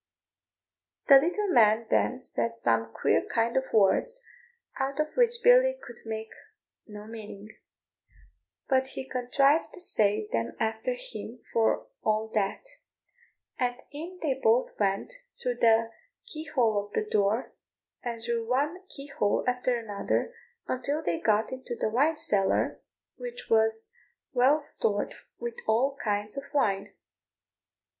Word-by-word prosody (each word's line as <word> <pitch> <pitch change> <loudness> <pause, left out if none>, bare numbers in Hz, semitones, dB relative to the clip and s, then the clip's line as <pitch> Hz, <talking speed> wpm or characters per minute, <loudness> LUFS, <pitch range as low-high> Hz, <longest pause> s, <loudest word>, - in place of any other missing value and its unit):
The 275 - +11
little 365 +8 0
man 225 -5 +5
then 255 +1 +1
said 230 0 -1
some 115 - 0
queer - - +2
kind 230 0 0
of 265 0 +2
words, 225 - +3 0.6
out 275 +2 -2
of 305 0 -1
which 475 -1 +2
Billy - - +6
could 240 - -11
make 220 0 -5 0.6
no 210 -1 -9
meaning; 215 -2 -9 1.2
but 265 -1 +2
he 265 - -4
contrived 275 +5 +2
to - - -11
say 215 - +1
them 115 0 -2
after 225 - -1
him - - -8
for 225 -1 +2 0.2
all 215 +1 0
that; 205 - -1 0.9
and 245 -1 +1 0.2
in 335 +5 -7
they 290 -4 +2
both 250 -1 +2
went 200 - 0 0.3
through 245 -1 -2
the 225 -1 +4 0.3
key 315 -10 -7
hole 225 -9 +1
of 205 - -24
the 215 - 0
door, 210 +3 +1 0.5
and 235 -2 -4
through 230 -1 -2
one 295 +9 0
key 275 - -8
hole 210 -8 0
after 250 0 +1
another, 225 - -2 0.3
until 285 +5 -2
they 170 - -1
got 215 +1 +1
into 260 -2 -5
the 220 - -1
wine 290 +8 +2
cellar, 210 -12 +1 0.4
which 485 -1 -8
was 225 0 +2 0.4
well 260 +4 +5
stored 210 -8 0 0.2
with 475 0 -4
all 260 +5 +2
kinds 210 +2 -1
of 275 - -4
wine. 195 -8 +1
240 Hz, 135 wpm, -28 LUFS, 215-290 Hz, 1.2 s, The